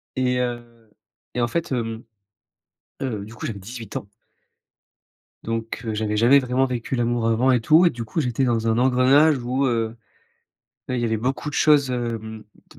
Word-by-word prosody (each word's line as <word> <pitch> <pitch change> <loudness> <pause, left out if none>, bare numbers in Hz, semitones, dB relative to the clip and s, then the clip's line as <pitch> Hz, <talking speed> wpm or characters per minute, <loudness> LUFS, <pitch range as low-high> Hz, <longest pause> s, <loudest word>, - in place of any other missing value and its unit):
et 125 -1 +1
heu, 120 -2 -5 0.4
et 125 - -1
en 120 - +2
fait, 170 -1 -2
hem, 115 -2 -3 1.0
heu, 110 -7 -3
du 110 - -12
coup, - - -9
j'avais 105 -3 -5
18 115 +2 -8
ans 100 - -5 1.4
donc 115 0 -4
heu, 110 - -2
j'avais 105 0 -1
jamais 125 +5 +6
vraiment 130 0 +1
vécu 125 0 -3
l'amour 120 -1 0
avant 120 +4 +3
et 125 - +3
tout, 160 +8 +5
et - - +6
du 120 -6 -6
coup, 115 +9 -2
j'étais 125 0 0
dans 115 -2 0
un 110 - +2
engrenage 130 +4 +4
où, 125 +3 -1
heu, 115 -2 -1 0.9
beh, 130 - -1
il - - -1
y - - +1
avait 110 -1 0
beaucoup 130 +6 -2
de - - -9
choses, 145 -4 +4
hem, 115 -3 -4 0.3
t - - -18
120 Hz, 190 wpm, -23 LUFS, 115-130 Hz, 1.4 s, jamais